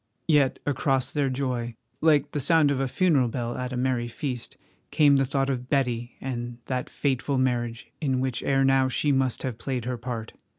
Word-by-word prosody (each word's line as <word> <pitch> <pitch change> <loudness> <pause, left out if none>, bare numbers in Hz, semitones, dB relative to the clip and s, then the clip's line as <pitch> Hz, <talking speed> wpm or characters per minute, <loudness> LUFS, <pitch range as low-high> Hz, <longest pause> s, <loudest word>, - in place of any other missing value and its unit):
Yet 145 -5 +3
across 135 -2 +1
their 145 -2 +1
joy, 125 -3 -2 0.3
like 150 -3 +3
the 145 - -2
sound 155 0 +4
of 135 - 0
a 135 - 0
funeral 145 -3 +2
bell 120 0 -3
at 125 0 -4
a 125 - -3
merry 125 -1 0
feast, 125 0 -5 0.3
came 145 -2 +5
the 135 - +2
thought 135 0 0
of 125 -2 -3
Betty 125 -3 0
and 120 -2 -4
that 130 0 -3
fateful 140 0 -1
marriage 120 -3 -1
in 135 -4 +1
which 130 -2 -1
ere 135 0 +2
now 135 -1 +3
she 145 +3 +1
must 130 -2 +1
have 125 -3 -4
played 125 -3 -3
her 125 0 -2
part. 115 -2 -5
130 Hz, 195 wpm, -26 LUFS, 125-140 Hz, 0.3 s, came